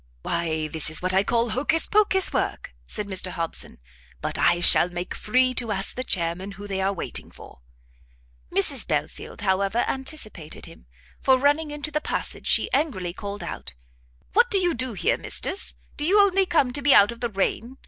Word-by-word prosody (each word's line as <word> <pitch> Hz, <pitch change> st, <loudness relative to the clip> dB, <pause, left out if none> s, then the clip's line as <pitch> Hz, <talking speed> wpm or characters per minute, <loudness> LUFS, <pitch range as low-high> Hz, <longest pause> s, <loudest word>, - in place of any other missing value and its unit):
"Why 160 Hz, -2 st, -1 dB
this 160 Hz, -1 st, -3 dB
is 155 Hz, -, 0 dB
what 185 Hz, 0 st, 0 dB
I 190 Hz, +1 st, +4 dB
call 235 Hz, +2 st, +1 dB
Hocus 290 Hz, +8 st, +2 dB
Pocus 405 Hz, -3 st, +2 dB
work!" -, -, -2 dB
said 210 Hz, -, -4 dB
Mr 190 Hz, -1 st, -2 dB
Hobson; 165 Hz, -2 st, -5 dB, 0.4 s
"but -, -, -4 dB
I 175 Hz, 0 st, +3 dB
shall 175 Hz, 0 st, +4 dB
make 175 Hz, +1 st, -5 dB
free 255 Hz, +4 st, +2 dB
to 235 Hz, -3 st, -2 dB
ask 195 Hz, -1 st, 0 dB
the 255 Hz, -, -4 dB
chairmen 185 Hz, -1 st, 0 dB
who 200 Hz, +2 st, -10 dB
they 195 Hz, -1 st, -2 dB
are 195 Hz, +1 st, +1 dB
waiting 195 Hz, -, -4 dB
for." -, -, -14 dB, 0.9 s
Mrs -, -, +1 dB
Belfield, -, -, -3 dB
however, 195 Hz, +3 st, +1 dB
anticipated 265 Hz, -, -4 dB
him; -, -, -15 dB, 0.3 s
for 265 Hz, -1 st, +4 dB
running 290 Hz, +3 st, +2 dB
into 295 Hz, +1 st, -4 dB
the 300 Hz, +1 st, -1 dB
passage, -, -, -3 dB
she -, -, +4 dB
angrily 200 Hz, -, 0 dB
called 200 Hz, +2 st, -6 dB
out, -, -, -6 dB, 0.6 s
"What 475 Hz, +4 st, +5 dB
do 400 Hz, -, +3 dB
you 355 Hz, -3 st, +2 dB
do 255 Hz, -1 st, -2 dB
here, 435 Hz, -, 0 dB
Misters? 390 Hz, -, -1 dB, 0.2 s
do 295 Hz, -, -3 dB
you 385 Hz, +7 st, +4 dB
only 390 Hz, -1 st, +4 dB
come 270 Hz, -8 st, +2 dB
to 285 Hz, -, -2 dB
be 280 Hz, 0 st, +5 dB
out 205 Hz, +2 st, +6 dB
of 235 Hz, -, -10 dB
the 240 Hz, -, -2 dB
rain? 225 Hz, +5 st, -2 dB
230 Hz, 190 wpm, -24 LUFS, 185-290 Hz, 0.9 s, out